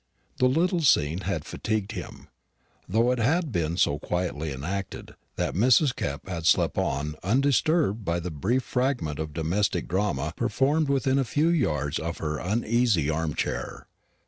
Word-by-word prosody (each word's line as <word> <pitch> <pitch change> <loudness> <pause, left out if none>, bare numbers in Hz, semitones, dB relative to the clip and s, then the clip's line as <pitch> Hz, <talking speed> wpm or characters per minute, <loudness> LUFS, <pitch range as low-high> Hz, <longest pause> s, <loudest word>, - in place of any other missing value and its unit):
The 130 - +4
little 170 +6 +1
scene 85 - +3
had 95 -5 -3
fatigued 110 -2 -2
him; - - -8 0.6
though 115 +6 +3
it 125 - -1
had 155 +6 +1
been 85 -3 -1
so 75 -5 +2
quietly 80 -3 -2
enacted, 90 +9 -5 0.2
that - - -1
Mrs. 125 - +4
Kepp 70 +5 -4
had 85 -3 -3
slept - - +3
on 75 +3 -1
undisturbed 135 - +2
by 85 -2 -1
the 85 +1 -5
brief 110 - 0
fragment 125 - -1
of 80 -1 -3
domestic 85 +3 -1
drama 85 -6 -1
performed 140 +5 +1
within 135 -1 +2
a - - +2
few 145 +7 +1
yards 75 - 0
of 85 +1 -4
her 75 -1 -3
uneasy 105 - +1
arm 80 -1 -2
chair. - - -3
100 Hz, 155 wpm, -26 LUFS, 80-130 Hz, 0.6 s, The